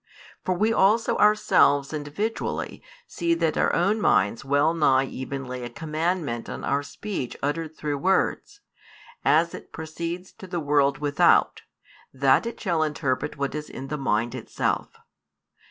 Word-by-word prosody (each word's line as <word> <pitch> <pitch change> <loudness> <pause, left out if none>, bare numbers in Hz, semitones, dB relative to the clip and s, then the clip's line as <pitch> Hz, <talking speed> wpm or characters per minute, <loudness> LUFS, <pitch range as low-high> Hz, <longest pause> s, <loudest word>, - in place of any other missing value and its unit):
For 185 - 0
we 215 +5 +2
also 220 +3 +3
ourselves 155 -9 +4
individually 155 +10 -3 0.2
see 170 - 0
that 165 -2 0
our - - +2
own 200 +6 +1
minds 100 - +2
well 145 +3 +2
nigh 135 -5 +3
even 135 +1 -5
lay 125 0 -6
a 120 - -5
commandment 160 -5 -2
on - - -6
our 140 +1 +1
speech 145 - -5
uttered 160 +2 -2
through 145 -2 -2
words, 190 - 0 0.6
as 165 +2 +3
it - - -10
proceeds 170 +3 -6
to 190 - -9
the 175 -1 -3
world 140 -2 +2
without, 145 0 +3 0.5
that 135 - +3
it 235 - -6
shall 170 -6 0
interpret 150 -2 -1
what 140 -1 -2
is 150 0 -5
in 135 +1 -8
the 150 - -2
mind 120 -3 0
itself. - - -2
150 Hz, 150 wpm, -25 LUFS, 140-175 Hz, 0.6 s, ourselves